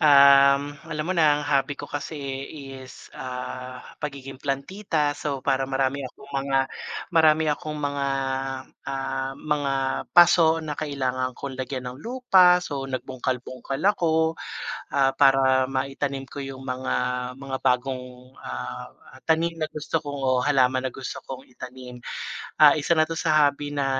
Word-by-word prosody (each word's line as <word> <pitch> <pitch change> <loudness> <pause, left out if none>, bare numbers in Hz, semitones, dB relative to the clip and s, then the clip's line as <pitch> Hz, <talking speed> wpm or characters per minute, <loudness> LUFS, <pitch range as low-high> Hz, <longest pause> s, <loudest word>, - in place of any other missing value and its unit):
ah, 140 -1 +8 0.3
alam 155 0 -3
mo 185 - 0
na, 155 -4 +4
ang - - -4
hobby 140 0 +1
ko - - -6
kasi 145 +2 -5 0.6
is, 130 -1 -12
ah, 125 0 -6 0.2
pagiging 135 -2 -6
plantita, 145 +2 -1
so, 140 -3 -3
para 135 -1 +2
marami 135 +1 0
akong 140 +2 -11
mga 135 0 +1 0.5
marami 160 -1 +5
akong 150 +1 -3
mga, 145 -1 -1 0.8
ah, 135 0 -2
mga 150 -2 -1 0.4
paso 165 -2 +7
na 150 -1 -3
kailangan 130 -4 -2
kong 135 -2 -6
lagyan 130 0 -4
ng 125 - -11
lupa 195 -7 +5
so, 140 -4 -4
nagbungkal-bungkal 130 0 -4
ako, 160 -5 +2 0.6
ah, 135 -2 +4
para 135 -1 +5
maitanim 135 +1 -2
ko - - -11
yung 135 -1 -7
mga 130 0 -2 0.5
mga 135 -1 -4
bagong, 125 0 -1
ah, 65 0 -6 0.4
tanim 165 +1 +2
na 155 - 0
gusto 155 +2 -2
kong 145 -1 -5
o 130 -1 +2
halaman 130 -2 +3
na - - -17
gusto 135 - -6
kong 130 0 -8
itanim. 125 0 -10 0.6
Ah, 150 -1 +9
isa 155 +3 +2
na 155 - +5
'to 165 - -5
sa 155 -2 +4
hobby 145 +1 -3
na, 140 -1 0
140 Hz, 145 wpm, -25 LUFS, 130-150 Hz, 0.8 s, Ah